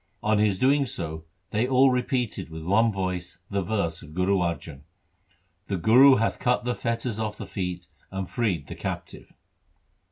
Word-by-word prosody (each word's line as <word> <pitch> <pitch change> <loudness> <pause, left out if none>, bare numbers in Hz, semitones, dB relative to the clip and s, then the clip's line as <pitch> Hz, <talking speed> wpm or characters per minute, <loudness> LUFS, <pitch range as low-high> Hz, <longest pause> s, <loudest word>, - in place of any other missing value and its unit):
On 110 -1 +2
his 105 -3 +2
doing 140 +4 +3
so 80 -6 -4 0.3
they 110 +4 +1
all 130 +1 +5
repeated 125 - -1
with 80 0 -8
one 110 +6 +3
voice 90 -2 -3
the 100 0 0
verse 90 -4 -1
of 75 +1 -13
Guru 95 +2 +2
Arjan: 85 -5 -3 0.4
— 90 0 -41
The 100 - -1
Guru 125 +9 +7
hath 115 0 0
cut 125 -1 +1
the 125 - 0
fetters 115 -1 -2
off 105 -2 -3
the 105 - -6
feet 90 -3 -4 0.2
and 95 -1 -4
freed 95 -6 -1
the - - -7
captive. - - -7
100 Hz, 170 wpm, -26 LUFS, 90-115 Hz, 0.4 s, Guru